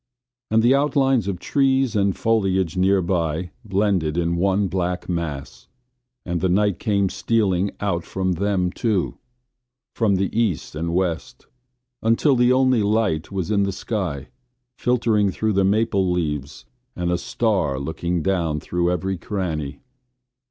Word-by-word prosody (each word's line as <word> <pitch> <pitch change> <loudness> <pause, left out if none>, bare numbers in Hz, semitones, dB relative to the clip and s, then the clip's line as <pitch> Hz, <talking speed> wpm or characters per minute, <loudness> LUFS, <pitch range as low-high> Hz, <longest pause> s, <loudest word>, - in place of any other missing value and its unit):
And 110 +1 +3
the 120 +3 +5
outlines 135 -5 +2
of 100 -3 -2
trees 135 +2 +1
and 100 -2 +1
foliage 95 -6 +1
nearby 90 -3 +1
blended 95 -6 0
in 85 0 +1
one 95 +3 +1
black 90 -1 -2
mass 85 -6 -4 0.6
and 85 -2 -2
the 95 - +1
night 100 0 +2
came 100 -3 +1
stealing 100 -2 +1
out 95 -5 -1
from 95 -1 -2
them, 90 0 0
too, 105 -4 0
and - - -11 0.8
from 105 -4 +2
the 95 +2 -1
east 110 -8 0
and 85 +2 -3
west, 90 -3 -2 0.6
until 115 +5 +3
the 125 0 +4
only 130 -2 +3
light 105 -6 0
was 95 0 -3
in 100 -1 +2
the 100 0 +1
sky, 90 - -4 0.5
filtering 115 -5 +1
through 110 +3 -1
the 100 0 +2
maple 100 -1 +2
leaves 75 -6 -3 0.3
and 90 0 -1
a 90 - +1
star 95 - 0
looking 80 +4 -2
down 85 -6 0
through 85 +2 -1
every 95 +1 -2
cranny. 80 -7 -4
95 Hz, 145 wpm, -22 LUFS, 85-110 Hz, 0.8 s, the